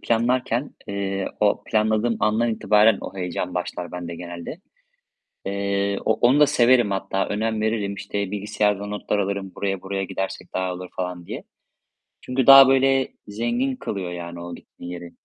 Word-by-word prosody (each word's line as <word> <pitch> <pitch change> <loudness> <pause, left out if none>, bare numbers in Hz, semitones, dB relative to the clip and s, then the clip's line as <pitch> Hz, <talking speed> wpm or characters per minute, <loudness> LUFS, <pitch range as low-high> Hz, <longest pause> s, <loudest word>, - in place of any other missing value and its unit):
planlarken, 120 +2 0
eee, 100 -1 -2
o 105 -1 +2
planladığım 110 +1 +1
andan 110 +2 +2
itibaren 105 -1 +4
o 100 - -8
heyecan 90 0 -3
başlar 90 -1 -4
bende 85 -1 -5
genelde. 85 - -7 0.9
Eee, 100 0 -1
o - - +4
onu 125 +4 +3
da 150 - +7
severim 120 -4 +4
hatta, 95 0 -1
önem 110 +1 -1
veririm. 110 -2 -1
İşte, 100 0 -4
bilgisayarda 105 0 0
notlar 105 0 -2
alırım 100 -1 -2
buraya 95 -2 -2
buraya 95 0 -3
gidersek 95 +1 -5
daha 95 -1 -1
olur 90 0 -8 0.4
diye. - - -6 0.8
Çünkü 125 0 -1
daha, 135 -1 +11
böyle, 135 0 +3 0.2
zengin 120 +5 -1
kılıyor 95 -7 -4
yani 85 0 -7
o 85 0 -7
gittiğin 90 - -11
yeri. 85 -1 -8
100 Hz, 150 wpm, -23 LUFS, 95-115 Hz, 0.9 s, daha